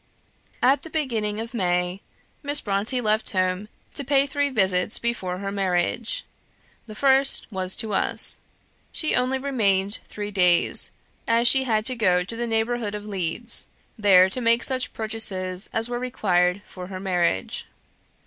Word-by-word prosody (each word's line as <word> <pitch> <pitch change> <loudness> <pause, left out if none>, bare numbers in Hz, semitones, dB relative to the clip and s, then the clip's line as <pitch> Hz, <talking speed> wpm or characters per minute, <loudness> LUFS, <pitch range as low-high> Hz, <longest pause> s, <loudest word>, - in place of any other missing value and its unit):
At 265 +2 +4
the 325 - -10
beginning 225 -9 -1
of 230 +2 -6
May, 180 -2 -1 0.4
Miss 290 0 +1
Brontë 215 +4 -1
left 215 0 +1
home 185 +2 -1 0.2
to 285 - -2
pay 275 0 +3
three 285 +1 0
visits 190 -4 +2
before 190 -6 -2
her 195 +1 -4
marriage. 195 +3 -1 0.6
The 215 - -9
first 270 +2 +3
was 185 -1 0
to 220 -2 -4
us. 190 - +1 0.5
She 310 - 0
only 255 +1 +1
remained 205 -7 +1
three 210 0 -6
days, 180 -3 +3 0.4
as 235 +1 +3
she 265 +1 +6
had 215 -3 0
to 255 - +1
go 180 -6 +2
to 210 +6 -6
the 240 +1 -3
neighbourhood 225 -1 -1
of 210 0 -7
Leeds, 200 +3 0 0.3
there 190 -3 +5
to 250 +7 -4
make 235 +1 +3
such 260 -1 -1
purchases 195 -4 -2
as 225 +1 +1
were 240 0 -3
required 190 -6 0
for 180 -1 -9
her 185 -1 -7
marriage. 175 - -1
215 Hz, 155 wpm, -24 LUFS, 185-245 Hz, 0.6 s, she